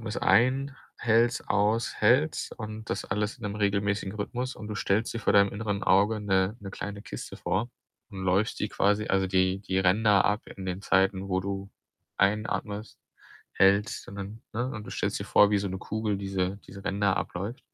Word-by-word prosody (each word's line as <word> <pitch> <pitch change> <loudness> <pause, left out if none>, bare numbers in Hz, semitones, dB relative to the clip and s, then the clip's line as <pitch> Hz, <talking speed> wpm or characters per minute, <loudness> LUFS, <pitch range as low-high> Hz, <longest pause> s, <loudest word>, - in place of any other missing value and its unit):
atmest 110 -1 -5
ein, 135 +3 +3 0.2
hältst, 115 +1 +2
aus, 105 +2 +1
hältst 130 +9 +2
und 110 0 -7
das - - -2
alles 105 +5 -2
in - - -16
'nem 105 -1 -3
regelmäßigen 100 -1 0
Rhythmus. 125 +5 -4
Und 105 - -8
du 105 - -4
stellst 105 +3 0
dir 115 - -3
vor - - +2
deinem 100 -1 +5
inneren 100 -1 -3
Auge 100 +4 +3
'ne 95 +1 +1
'ne 100 -1 -7
kleine 100 +1 -6
Kiste - - -7
vor 115 +6 -1 0.4
und 95 -1 -7
läufst 95 +4 +1
die - - 0
quasi 105 +2 +1
also 95 0 +2
die 95 +1 +1
die 95 -2 -1
Ränder 100 +1 +4
ab 105 +2 +1
in 95 -1 -8
den 90 +2 -4
Zeiten, 95 0 +2
wo 95 0 +1
du 100 +1 -5 0.5
einatmest, 105 +1 -1 0.5
hältst 100 +2 +2
und 100 - -9
dann, 100 +3 -7
ne? 120 +3 -1
Und 110 -4 -6
du - - -8
stellst - - -1
dir - - -3
vor, 105 - +5
wie 105 - +3
so 100 - -2
'ne 95 0 -4
Kugel 110 0 -2
diese 95 0 -2
diese 100 0 -11
Ränder 100 0 +1
abläuft. 100 +8 -4
100 Hz, 195 wpm, -28 LUFS, 95-110 Hz, 0.5 s, deinem